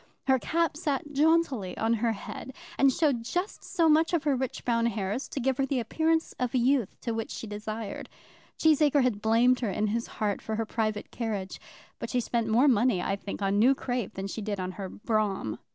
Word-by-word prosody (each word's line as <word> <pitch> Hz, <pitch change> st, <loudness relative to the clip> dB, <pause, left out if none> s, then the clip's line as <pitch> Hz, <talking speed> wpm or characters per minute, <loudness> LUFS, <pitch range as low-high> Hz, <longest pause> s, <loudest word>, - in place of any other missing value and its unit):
Her 265 Hz, -1 st, +4 dB
cap 325 Hz, +2 st, 0 dB
sat 295 Hz, -2 st, -2 dB
jauntily 285 Hz, -, +2 dB
on 225 Hz, +1 st, +1 dB
her 230 Hz, 0 st, +1 dB
head, 240 Hz, +4 st, -8 dB, 0.2 s
and 275 Hz, -1 st, +6 dB
showed 280 Hz, -5 st, +1 dB
just 360 Hz, -, -3 dB
so 335 Hz, -3 st, +1 dB
much 320 Hz, +2 st, +4 dB
of 330 Hz, -4 st, +2 dB
her 290 Hz, -2 st, +2 dB
rich 260 Hz, -1 st, -4 dB
brown 235 Hz, -1 st, +2 dB
hair 200 Hz, -4 st, -2 dB
as 255 Hz, +7 st, -3 dB
to -, -, -4 dB
give 265 Hz, 0 st, 0 dB
her 270 Hz, -, +3 dB
the 270 Hz, -1 st, 0 dB
appearance 320 Hz, +7 st, 0 dB
of 250 Hz, 0 st, -1 dB
youth 255 Hz, -2 st, +3 dB, 0.2 s
which 225 Hz, -2 st, -2 dB
she -, -, -6 dB
desired. 215 Hz, 0 st, -5 dB, 0.5 s
Cheesacre 300 Hz, -3 st, +4 dB
had 225 Hz, -5 st, 0 dB
blamed 235 Hz, +3 st, +4 dB
her 230 Hz, -, -1 dB
in 210 Hz, +2 st, 0 dB
his 230 Hz, +2 st, -1 dB
heart 205 Hz, -2 st, -1 dB
for 220 Hz, -, -3 dB
her 225 Hz, +1 st, -1 dB
private 215 Hz, -1 st, -2 dB
carriage, 210 Hz, -5 st, -4 dB, 0.4 s
but -, -, -5 dB
she 250 Hz, -, +1 dB
spent 235 Hz, -1 st, -1 dB
more 235 Hz, +6 st, +4 dB
money, 240 Hz, -5 st, +3 dB
I 195 Hz, +2 st, -1 dB
think, 200 Hz, 0 st, -6 dB
on 195 Hz, +1 st, +2 dB
new 255 Hz, +5 st, +5 dB
crape 245 Hz, -5 st, -3 dB
than 195 Hz, -, -4 dB
she 195 Hz, +3 st, -5 dB
did 205 Hz, -1 st, -3 dB
on 185 Hz, 0 st, -3 dB
her 190 Hz, 0 st, -6 dB
brougham. 205 Hz, -, -1 dB
235 Hz, 210 wpm, -28 LUFS, 215-275 Hz, 0.5 s, and